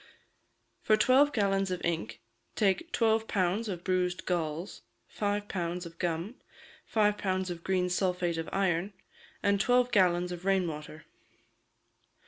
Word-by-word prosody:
For 215 - +3
twelve 260 +6 +5
gallons 195 -4 +1
of 180 -1 -2
ink 170 -1 -3 0.3
take 205 - +1
twelve 225 -1 +2
pounds 195 +3 0
of 180 -3 -5
bruised 180 -1 0
galls, 170 +1 -3 0.3
five 205 0 -2
pounds 175 -1 -3
of 170 0 -11
gum, 175 +7 -2 0.5
five 210 -2 +2
pounds 185 -1 -1
of 170 -1 -7
green 185 -1 +1
sulphate 180 -2 0
of 165 - -4
iron, 190 0 0 0.5
and 200 -1 +3
twelve 245 +2 +3
gallons 180 -3 +3
of 175 0 -6
rain 190 -2 +2
water. 155 0 -8
185 Hz, 135 wpm, -30 LUFS, 175-205 Hz, 0.5 s, twelve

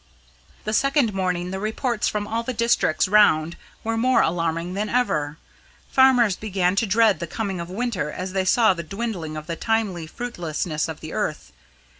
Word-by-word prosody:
The 215 - -3
second 275 -3 +2
morning 180 -2 -1
the 190 - -3
reports 220 +2 -1
from 210 -1 -2
all 225 +2 -1
the 255 +2 -4
districts 235 -9 +2
round 175 -6 +4 0.3
were 225 0 -1
more 255 +2 +3
alarming 165 +1 -1
than 205 +2 -2
ever. 155 -12 0 0.5
Farmers 250 -6 +5
began 190 -3 0
to 225 - +2
dread 210 -3 +3
the 170 - -4
coming 195 0 -3
of 170 0 -6
winter 200 -5 -2
as 185 +4 -5
they 190 -1 0
saw 220 +2 +4
the 170 - -5
dwindling 180 -4 -4
of 155 - -7
the 170 - -4
timely 205 -6 -1
fruitfulness 165 -8 -3
of 160 -2 -7
the 160 - -7
earth. - - -3
195 Hz, 175 wpm, -23 LUFS, 170-225 Hz, 0.5 s, Farmers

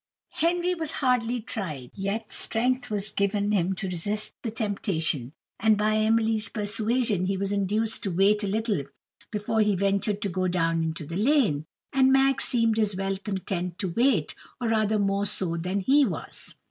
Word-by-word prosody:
Henry 350 +2 +2
was 325 -3 -3
hardly 250 -3 +1
tried, 185 - -5
yet 205 +3 -3
strength 245 +2 -1
was 210 -1 -2
given 200 +1 0
him 190 -2 +1
to 195 +1 -3
resist 205 +4 -2
the 230 - -3
temptation; 195 - -1 0.3
and 220 -1 +4
by 215 +1 +2
Emily's 220 0 +2
persuasion 210 -2 0
he 195 0 0
was 195 +1 -2
induced 210 +3 +1
to 200 - -2
wait 200 +4 +3
a - - 0
little 215 -3 0 0.5
before 215 +1 0
he 210 -2 +3
ventured 200 +2 +1
to - - +1
go 185 +1 -1
down 165 -2 +1
into 160 -1 -3
the 165 - -6
lane. 215 - +2 0.3
And 265 -1 +4
Mag 270 0 +4
seemed 230 -4 +2
as 210 -3 +1
well 195 +1 -1
content 190 -3 -4
to 190 - -2
wait, 235 - +2 0.3
or 240 -2 -1
rather 215 -1 +2
more 200 0 +1
so 180 -3 0
than 180 +4 -2
he 280 +8 +4
was. 185 - -4
205 Hz, 170 wpm, -26 LUFS, 190-225 Hz, 0.5 s, and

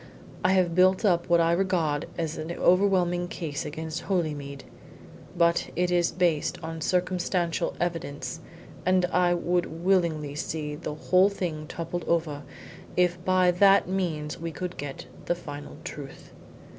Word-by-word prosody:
I 185 +1 +4
have 180 -3 +3
built 185 +4 +4
up 175 -3 +2
what 170 0 +5
I 165 0 +3
regard 170 -5 +1
as 165 -2 -2
an 160 +2 -5
overwhelming 180 -1 +3
case 160 -5 -4
against 160 +1 -5
Holymead. 150 -7 -2 0.7
But 170 0 +3
it 180 0 +1
is 175 -1 +2
based 170 -5 +1
on 165 0 -5
circumstantial 180 0 0
evidence, 165 -2 -3 0.4
and 185 0 +3
I 175 -1 +3
would 175 0 0 0.2
willingly 170 -6 +1
see 150 0 -3
the 150 0 -5
whole 185 +5 +4
thing 165 -6 -4
toppled 170 +1 -4
over 160 -4 0 0.6
if 180 -1 +2
by 185 -1 +4
that 195 +2 +5
means 165 -6 -2
we 165 0 -3
could 180 +2 -5
get 140 -1 -6 0.2
the 175 - +1
final 145 -4 -8
truth. 140 -2 -9
170 Hz, 145 wpm, -27 LUFS, 155-180 Hz, 0.7 s, what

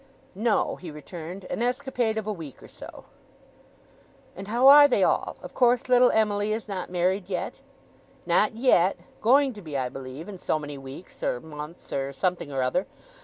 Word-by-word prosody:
'No,' 215 +3 0
he 180 - -9
returned. 165 +4 -8
'An - - -3
escapade 245 -2 -1
of 220 - -3
a 215 - -2
week 160 -8 -10
or - - -11
so.' - - -12 1.3
'And 195 +2 -8
how 240 +5 +3
are 290 +1 +10
they 270 - +2
all? - - 0
Of - - -9
course, 245 +1 +3
little 250 0 +5
Emily 210 -1 +1
is 225 0 -4
not 190 -3 -5
married 185 +2 0
yet?' 180 - -4 0.6
'Not 230 - +2
yet. 210 -7 +3 0.2
Going 270 +3 +4
to 210 - -11
be, 155 -5 -5
I 130 -1 -1
believe 135 +4 -8
in 195 -3 -9
so 155 - 0
many 145 -2 -7
weeks, 135 +6 -11
or 125 - -1
months, 150 +2 -9
or 135 0 -2
something 170 +1 -2
or 135 -1 -1
other. 150 +9 0
190 Hz, 180 wpm, -26 LUFS, 150-230 Hz, 1.3 s, are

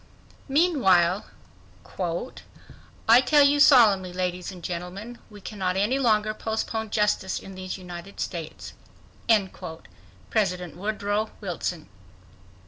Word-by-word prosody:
Meanwhile:— 210 - +3 1.8
"I 235 +3 +8
tell 290 +3 +5
you 285 +1 +4
solemnly, 210 -10 +6
ladies 180 0 -3
and 180 -2 -12
gentlemen, 185 +8 -6
we 205 -2 -13
cannot 190 -3 -3
any 220 +8 +1
longer 215 -4 +2
postpone 220 0 -3
justice 210 -3 0
in 195 - -11
these 185 0 -6
United 180 +1 -10
States"—President 180 +1 -4
Wilson. 210 +1 -3
200 Hz, 90 wpm, -25 LUFS, 180-225 Hz, 1.8 s, I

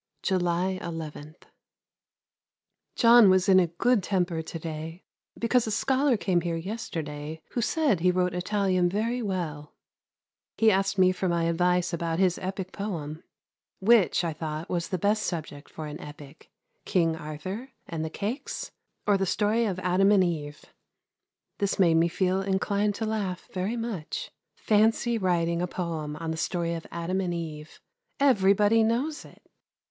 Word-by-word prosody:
July 185 0 0
11. 155 -2 -7 1.6
John 235 -3 +7
was 185 +1 +3
in 185 -1 +6
good 245 0 +3
temper 180 -3 -1
to 160 +1 -7
day, 160 +2 -6 0.3
because 235 0 +2
a - - -2
scholar 265 +3 +2
came 185 -3 +1
here 170 0 -2
yesterday 160 -5 -5
who 240 - -1
said 285 - +1
he 180 +2 +3
wrote 180 0 +1
Italian 185 -1 +1
very 230 +6 -1
well. 165 -8 -4 0.8
He 225 -1 +5
asked 195 0 +1
me 185 -1 +5
for 185 0 -2
my 170 -1 +1
advice 175 +1 +1
about 165 -1 -1
his 185 -1 +2
epick 190 0 -4
poem 165 -6 -5 0.6
which 205 -3 +4
I 165 -2 -1
thought 155 +1 -5
was 170 -1 -1
the 185 - -2
best 205 +4 +1
subject 155 -6 -5
for 155 - -7
an 150 +2 -7
epick, 145 -2 -12 0.3
King 165 -4 +1
Arthur 170 - -6 0.2
and 165 -3 -4
the 160 - -3
Cakes 245 - -4 0.3
or 205 -1 +3
the 195 - 0
story 215 +5 +1
of 195 -4 -2
Adam 185 +2 +3
and 200 -3 +5
Eve. 150 -4 -3 0.9
This 200 -1 0
made 175 -4 +4
me 165 +1 +4
feel 185 +2 0
inclined 200 +1 0
to 225 - -3
laugh 205 -4 -3
very 195 +6 -2
much. 230 - -4 0.2
Fancy 225 +2 +2
writing 170 -3 +1
a 180 - 0
poem 165 -4 -4
on 165 +1 -4
the 160 - -4
story 170 0 -1
of 165 -1 -6
Adam 170 +3 -2
and 175 -2 -2
Eve! 155 -2 -7 0.4
Everybody 210 -4 +4
knows 255 +8 -1
it! - - -17
185 Hz, 155 wpm, -27 LUFS, 165-205 Hz, 1.6 s, John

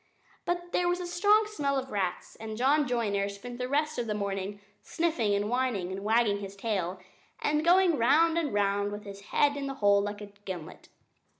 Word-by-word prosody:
But 350 0 -2
there 355 - +1
was 355 +1 0
a 360 - -4
strong 415 +5 +3
smell 290 -10 -1
of 265 0 -4
rats; 190 -3 -3
and 220 -1 -6
John 280 +4 +3
Joiner 205 -5 0
spent 240 +5 -8
the 250 0 -3
rest 300 0 0
of 235 - -2
the 210 - -1
morning 200 0 -3 0.2
sniffing 315 -12 0
and 205 +1 0
whining, 235 -7 -1
and 195 +1 -5
wagging 215 -1 +2
his 200 -1 -7
tail, 195 -4 -2 0.4
and 300 +1 +1
going 350 -3 +4
round 320 +8 +4
and 325 -5 0
round 205 0 +1
with 205 0 -6
his 200 -1 -9
head 285 +5 +2
in 280 -1 -3
the 270 - -4
hole 205 -4 +4
like 205 0 -4
a 205 -1 -9
gimlet. 180 -5 -8
230 Hz, 200 wpm, -29 LUFS, 200-295 Hz, 0.4 s, going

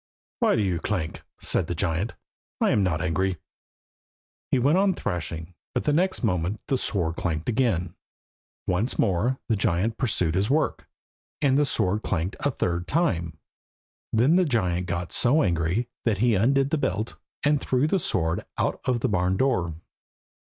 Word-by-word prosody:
"Why - - +3
do 110 - +1
you 90 -4 0
clank?" 85 -4 -3 0.2
said - - 0
the 85 - -2
giant. 85 +5 -1 0.4
"I - - +3
am 105 - +3
not 85 -4 0
angry." 90 +2 0 1.1
He - - +3
went 145 +8 +3
on 195 -2 +3
thrashing, 80 0 -4 0.2
but - - +1
the 150 - +2
next 185 +2 +1
moment 90 -1 0
the 135 - +2
sword 85 -8 -1
clanked 80 -3 -2
again. 105 -8 +1 0.7
Once 95 +8 0
more 110 +6 +1
the 115 - +2
giant 100 +3 0
pursued 100 -10 +1
his 95 +5 +1
work, 155 +3 0 0.5
and 135 -2 +3
the 145 0 +3
sword 105 -3 0
clanked 90 -2 -2
a 145 - +1
third 90 -8 -2
time. 85 - 0 0.7
Then 130 +10 +4
the 185 - +5
giant 90 - 0
got 85 0 -3
so 135 +6 +3
angry 85 +5 0 0.2
that 110 -4 +1
he 120 +3 +3
undid 135 +7 +2
the 160 - +1
belt, 110 -1 -1 0.3
and 145 0 +3
threw 130 +2 +1
the 190 +5 +2
sword 85 - -1
out - - -1
of 125 -2 +1
the - - +2
barn 95 -1 +1
door. 95 - +1
100 Hz, 165 wpm, -26 LUFS, 85-130 Hz, 1.1 s, the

